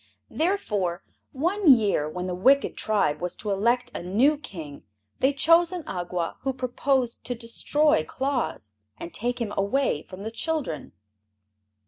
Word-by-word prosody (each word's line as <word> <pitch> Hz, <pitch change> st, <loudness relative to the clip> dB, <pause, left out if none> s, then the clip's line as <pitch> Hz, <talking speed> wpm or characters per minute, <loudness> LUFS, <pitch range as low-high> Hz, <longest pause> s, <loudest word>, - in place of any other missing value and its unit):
Therefore, 210 Hz, -, -1 dB, 0.3 s
one 345 Hz, +6 st, +1 dB
year 205 Hz, -, +3 dB
when 180 Hz, +3 st, -5 dB
the 185 Hz, -, -3 dB
wicked 265 Hz, +10 st, +3 dB
tribe 205 Hz, -9 st, +1 dB
was 180 Hz, 0 st, -3 dB
to 210 Hz, -, -4 dB
elect 240 Hz, +5 st, +1 dB
a -, -, -5 dB
new 225 Hz, -, +3 dB
King, 165 Hz, -, -9 dB, 0.4 s
they 265 Hz, -, +3 dB
chose 330 Hz, +5 st, +5 dB
an 360 Hz, -3 st, -5 dB
Awgwa 175 Hz, -, -4 dB
who 270 Hz, 0 st, -2 dB
proposed 255 Hz, -1 st, -1 dB
to 245 Hz, -, -2 dB
destroy 235 Hz, -, +1 dB
Claus 250 Hz, -, -3 dB, 0.2 s
and 170 Hz, -, -8 dB
take 245 Hz, +6 st, -2 dB
him 225 Hz, -4 st, -3 dB
away 200 Hz, -, +1 dB
from 185 Hz, +3 st, -10 dB
the 220 Hz, -, -4 dB
children. 280 Hz, -, -3 dB
235 Hz, 145 wpm, -26 LUFS, 185-280 Hz, 0.4 s, chose